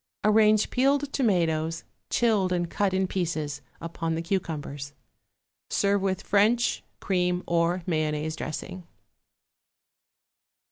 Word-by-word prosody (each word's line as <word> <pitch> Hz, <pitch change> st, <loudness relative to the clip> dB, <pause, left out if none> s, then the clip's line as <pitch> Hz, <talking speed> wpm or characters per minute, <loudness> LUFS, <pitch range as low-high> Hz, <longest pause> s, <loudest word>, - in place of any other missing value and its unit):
Arrange 215 Hz, 0 st, +4 dB
peeled 275 Hz, +2 st, +1 dB
tomatoes, 165 Hz, -, +1 dB, 0.3 s
chilled 215 Hz, -6 st, +2 dB
and 175 Hz, -1 st, -1 dB
cut 200 Hz, -2 st, +1 dB
in 190 Hz, 0 st, +1 dB
pieces, 155 Hz, -6 st, -2 dB, 0.2 s
upon 165 Hz, 0 st, -3 dB
the 165 Hz, -, -2 dB
cucumbers. 150 Hz, -6 st, -3 dB, 0.8 s
Serve 200 Hz, 0 st, +2 dB
with 190 Hz, -1 st, -1 dB
French, 220 Hz, +4 st, +2 dB, 0.2 s
cream 180 Hz, -1 st, 0 dB
or 170 Hz, +1 st, +1 dB
mayonnaise 155 Hz, -2 st, -1 dB
dressing. 180 Hz, +3 st, -6 dB
180 Hz, 100 wpm, -27 LUFS, 165-200 Hz, 0.8 s, Arrange